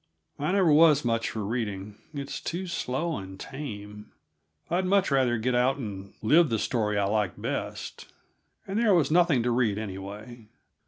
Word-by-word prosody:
I 150 Hz, +5 st, 0 dB
never 185 Hz, -6 st, +4 dB
was 150 Hz, -3 st, +6 dB
much 115 Hz, -1 st, 0 dB
for 110 Hz, -2 st, -4 dB
reading; 105 Hz, -3 st, -3 dB, 0.2 s
it's 140 Hz, -2 st, -5 dB
too 180 Hz, +3 st, -3 dB
slow 165 Hz, -1 st, -2 dB
and 95 Hz, -1 st, -9 dB
tame. 105 Hz, -7 st, -8 dB, 0.6 s
I'd 175 Hz, +3 st, 0 dB
much 195 Hz, -4 st, +3 dB
rather 130 Hz, -3 st, +3 dB
get 125 Hz, +3 st, 0 dB
out 125 Hz, +3 st, +2 dB
and 100 Hz, -6 st, -7 dB
live 155 Hz, +7 st, +5 dB
the 115 Hz, -, +1 dB
story 105 Hz, -2 st, 0 dB
I 100 Hz, -, +2 dB
like 105 Hz, -3 st, -1 dB
best. -, -, -5 dB, 0.6 s
And 195 Hz, +3 st, -1 dB
there 220 Hz, -5 st, +4 dB
was 165 Hz, -3 st, +2 dB
nothing 165 Hz, -7 st, +4 dB
to 120 Hz, -, +1 dB
read, 115 Hz, -4 st, +1 dB
anyway. 105 Hz, +3 st, -7 dB
120 Hz, 165 wpm, -27 LUFS, 105-155 Hz, 0.6 s, was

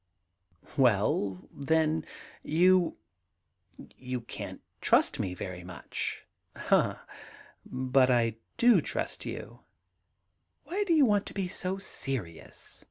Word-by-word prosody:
* 90 Hz, -3 st, -34 dB
Well 100 Hz, -6 st, +2 dB
then, 155 Hz, +2 st, +1 dB, 0.3 s
you 180 Hz, +2 st, +3 dB, 0.5 s
— -, -, -39 dB, 0.2 s
you 125 Hz, -1 st, -4 dB
can't 115 Hz, -, -8 dB, 0.2 s
trust -, -, +3 dB
me 90 Hz, -1 st, -2 dB
very 90 Hz, -1 st, -6 dB
much.' 90 Hz, -1 st, -5 dB, 0.3 s
•Ah, -, -, +2 dB, 0.7 s
but 130 Hz, 0 st, +3 dB
I 115 Hz, -3 st, +2 dB, 0.2 s
do 240 Hz, 0 st, +6 dB
trust -, -, -4 dB
you.... -, -, -7 dB, 1.0 s
Why 395 Hz, +4 st, -1 dB
do 350 Hz, -, +3 dB
you 295 Hz, -3 st, +6 dB
want 205 Hz, -3 st, +2 dB
to -, -, -9 dB
be 195 Hz, -2 st, -1 dB
so 185 Hz, +1 st, -2 dB
serious 130 Hz, -, -5 dB
130 Hz, 115 wpm, -30 LUFS, -, 1.0 s, do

